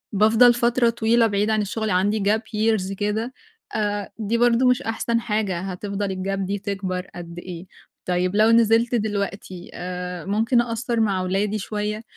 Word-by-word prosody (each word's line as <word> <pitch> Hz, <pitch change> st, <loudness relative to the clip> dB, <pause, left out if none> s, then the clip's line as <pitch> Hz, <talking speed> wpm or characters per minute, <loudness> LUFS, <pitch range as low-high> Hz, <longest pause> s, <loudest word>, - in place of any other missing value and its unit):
بافضل 225 Hz, +4 st, +6 dB
فترة 240 Hz, 0 st, +2 dB
طويلة 230 Hz, 0 st, +3 dB
بعيدة 210 Hz, +1 st, 0 dB
عن 215 Hz, -, +2 dB
الشغل 220 Hz, +2 st, -2 dB
عندي 200 Hz, +4 st, +1 dB
gap 210 Hz, +2 st, +2 dB
years 215 Hz, -3 st, -1 dB
كده، 215 Hz, +5 st, -2 dB, 0.4 s
آآ، 205 Hz, -1 st, -2 dB
دي 225 Hz, +2 st, 0 dB
برضه 240 Hz, +1 st, +3 dB
مش 250 Hz, 0 st, +3 dB
أحسن 230 Hz, +1 st, -1 dB
حاجة 210 Hz, -6 st, -1 dB
هتفضل 200 Hz, +2 st, -4 dB
الgap 195 Hz, +1 st, -3 dB
دي 195 Hz, +1 st, -2 dB
تكبر 190 Hz, -2 st, -4 dB
قد 170 Hz, 0 st, -8 dB
إيه؟ 180 Hz, 0 st, -8 dB, 0.4 s
طيب، 180 Hz, +1 st, 0 dB
لو 215 Hz, +2 st, +5 dB
نزِلت 230 Hz, +1 st, +4 dB
دلوقتي، 200 Hz, -4 st, -3 dB
آآ، 180 Hz, -1 st, -5 dB
ممكن 225 Hz, +5 st, +2 dB
أقصِّر 235 Hz, 0 st, -2 dB
مع 200 Hz, -4 st, +1 dB
ولادي 195 Hz, +3 st, 0 dB
شوية. 210 Hz, +1 st, -3 dB
210 Hz, 160 wpm, -23 LUFS, 195-225 Hz, 0.4 s, بافضل